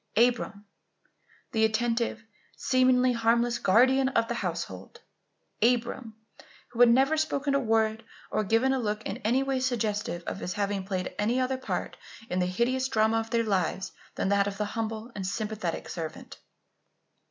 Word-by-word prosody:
Abram! 230 Hz, -3 st, +2 dB, 0.9 s
the 220 Hz, -, +1 dB
attentive, 230 Hz, 0 st, 0 dB, 0.3 s
seemingly 255 Hz, -1 st, +3 dB
harmless, 235 Hz, +1 st, +2 dB
guardian 260 Hz, +6 st, +4 dB
of 230 Hz, -3 st, +1 dB
the -, -, 0 dB
household! 170 Hz, -, -5 dB, 0.6 s
Abram! 235 Hz, -1 st, +1 dB, 0.5 s
who 240 Hz, -1 st, -10 dB
had 245 Hz, -1 st, +8 dB
never 270 Hz, +6 st, +4 dB
spoken 290 Hz, -2 st, 0 dB
a 280 Hz, -, +3 dB
word 225 Hz, -2 st, +1 dB, 0.3 s
or 215 Hz, -, +1 dB
given 225 Hz, +6 st, +2 dB
a 265 Hz, -, 0 dB
look 215 Hz, -2 st, -2 dB
in -, -, -4 dB
any 245 Hz, +5 st, +1 dB
way 270 Hz, -1 st, -1 dB
suggestive 215 Hz, -8 st, -1 dB
of -, -, -5 dB
his 180 Hz, -, -4 dB
having 200 Hz, -2 st, -2 dB
played 185 Hz, -2 st, -3 dB
any 230 Hz, +5 st, +1 dB
other 255 Hz, 0 st, 0 dB
part 260 Hz, -, -4 dB, 0.3 s
in 180 Hz, -, 0 dB
the 180 Hz, -, +1 dB
hideous 245 Hz, +7 st, 0 dB
drama 220 Hz, -2 st, +2 dB
of 225 Hz, 0 st, -5 dB
their 230 Hz, 0 st, +1 dB
lives 190 Hz, -2 st, -1 dB, 0.2 s
than -, -, -1 dB
that 200 Hz, 0 st, +3 dB
of 200 Hz, 0 st, -4 dB
the 210 Hz, -, -1 dB
humble 225 Hz, +1 st, -4 dB
and 190 Hz, -2 st, -4 dB
sympathetic 210 Hz, -3 st, -3 dB
servant! 160 Hz, -2 st, -7 dB
225 Hz, 160 wpm, -28 LUFS, 205-250 Hz, 0.9 s, had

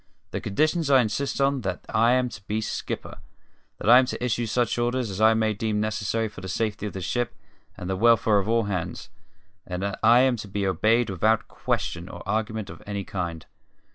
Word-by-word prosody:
The -, -, -3 dB
conditions 155 Hz, -, +1 dB
I 135 Hz, -2 st, +6 dB
insist 130 Hz, +5 st, -1 dB
on 140 Hz, 0 st, +2 dB
are -, -, -3 dB
that 95 Hz, -4 st, -4 dB
I 115 Hz, +2 st, +3 dB
am 130 Hz, 0 st, +2 dB
to 105 Hz, -, -10 dB
be 105 Hz, +1 st, -1 dB
skipper; 110 Hz, -, -5 dB, 0.6 s
that -, -, -6 dB
I 120 Hz, +2 st, +9 dB
am 130 Hz, -, +2 dB
to 125 Hz, -, -4 dB
issue 120 Hz, -1 st, 0 dB
such 120 Hz, +2 st, 0 dB
orders 120 Hz, -2 st, 0 dB
as 95 Hz, +2 st, -4 dB
I 110 Hz, +1 st, +6 dB
may 110 Hz, -1 st, +1 dB
deem 105 Hz, 0 st, -1 dB
necessary 110 Hz, +1 st, -1 dB
for 105 Hz, -, -11 dB
the 95 Hz, -, -6 dB
safety 105 Hz, +2 st, -2 dB
of -, -, -7 dB
the 95 Hz, -, -5 dB
ship 120 Hz, +7 st, -2 dB, 0.4 s
and 90 Hz, -, -6 dB
the 95 Hz, -, -1 dB
welfare 110 Hz, 0 st, +4 dB
of 100 Hz, +2 st, -3 dB
all 115 Hz, 0 st, +3 dB
hands; 90 Hz, -4 st, -4 dB, 0.5 s
and 90 Hz, +1 st, -5 dB
that 100 Hz, 0 st, -3 dB
I 115 Hz, +3 st, +6 dB
am 130 Hz, -2 st, +3 dB
to 105 Hz, -, -7 dB
be 100 Hz, 0 st, -2 dB
obeyed 110 Hz, +5 st, +2 dB
without 110 Hz, +4 st, +1 dB
question -, -, -3 dB
or -, -, -10 dB
argument 110 Hz, -2 st, -2 dB
of -, -, -12 dB
any 100 Hz, -1 st, -3 dB
kind. 85 Hz, -4 st, -4 dB
110 Hz, 215 wpm, -25 LUFS, 100-120 Hz, 0.6 s, I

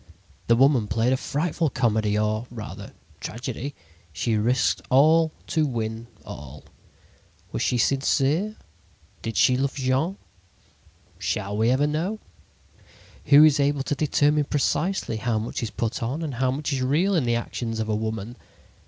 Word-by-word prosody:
The 115 Hz, -, +5 dB
little 135 Hz, +3 st, +6 dB
woman 125 Hz, -7 st, +1 dB
played 115 Hz, +4 st, +1 dB
a -, -, +3 dB
frightful 160 Hz, +4 st, -1 dB
comedy, 110 Hz, -4 st, +1 dB
or, 110 Hz, +2 st, -1 dB
rather, 110 Hz, -4 st, -8 dB, 0.3 s
tragedy. 130 Hz, +4 st, -5 dB, 0.4 s
She 110 Hz, +8 st, -1 dB
risked 120 Hz, +5 st, +1 dB
all 155 Hz, +4 st, +5 dB
to 155 Hz, -2 st, +1 dB
win 115 Hz, -2 st, -4 dB, 0.2 s
all. 75 Hz, 0 st, -9 dB, 0.9 s
Was -, -, -3 dB
she 125 Hz, -, +1 dB
sincere? 140 Hz, -, +1 dB, 0.7 s
Did 115 Hz, -1 st, -4 dB
she 125 Hz, -, +5 dB
love 135 Hz, +1 st, -1 dB
Jean? 135 Hz, +8 st, 0 dB, 1.0 s
Shall 100 Hz, +1 st, -2 dB
we 110 Hz, +2 st, +2 dB
ever 130 Hz, +3 st, +3 dB
know? 165 Hz, +8 st, -1 dB, 1.1 s
Who 145 Hz, +1 st, +8 dB
is 155 Hz, -2 st, +5 dB
able 140 Hz, -1 st, +1 dB
to 145 Hz, -, -2 dB
determine 150 Hz, 0 st, +2 dB
precisely 145 Hz, -, 0 dB
how 115 Hz, 0 st, -1 dB
much 110 Hz, +2 st, -3 dB
is 115 Hz, -, -2 dB
put 115 Hz, -1 st, -3 dB
on 130 Hz, +8 st, -2 dB
and 150 Hz, -4 st, -3 dB
how 130 Hz, +1 st, 0 dB
much 140 Hz, +3 st, -2 dB
is 135 Hz, -, -1 dB
real 155 Hz, +10 st, +2 dB
in 160 Hz, -8 st, +2 dB
the 120 Hz, 0 st, +1 dB
actions 115 Hz, -1 st, -3 dB
of 110 Hz, -, -2 dB
a 110 Hz, -, 0 dB
woman? 110 Hz, +2 st, -4 dB
130 Hz, 155 wpm, -24 LUFS, 115-145 Hz, 1.1 s, Who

